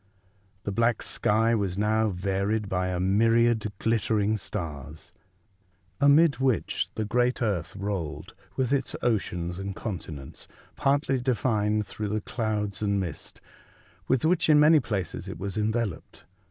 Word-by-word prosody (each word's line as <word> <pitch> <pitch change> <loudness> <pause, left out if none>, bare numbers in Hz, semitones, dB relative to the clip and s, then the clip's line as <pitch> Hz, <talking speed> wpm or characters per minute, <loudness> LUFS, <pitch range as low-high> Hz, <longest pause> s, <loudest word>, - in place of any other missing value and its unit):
The 100 - -3
black 115 +2 +1
sky 115 +2 +1
was 100 -4 -1
now 110 +1 +2
varied 100 +3 -1
by 90 -1 -1
a 90 -1 -2
myriad 110 +3 +3
glittering 110 -1 +1
stars, 80 -4 -7 0.9
amid 145 0 +5
which 130 -4 0
the 110 - -2
great 125 +3 +1
earth 100 -9 -1
rolled 95 -6 -4 0.2
with 130 0 0
its 135 -1 0
oceans 90 -6 -1
and 95 0 -5
continents 80 - -7 0.3
partly 140 -1 +1
defined 110 -4 +1
through 105 +1 -5
the 105 +1 -1
clouds 105 -3 -2
and 100 -1 +1
mist, 90 -5 -6 0.7
with 130 +2 +2
which, 165 0 +2
in 150 -1 +7
many 155 +1 +7
places, 105 - -4
it - - -6
was 100 0 -5
enveloped. 110 -3 -2
105 Hz, 135 wpm, -27 LUFS, 95-120 Hz, 0.9 s, in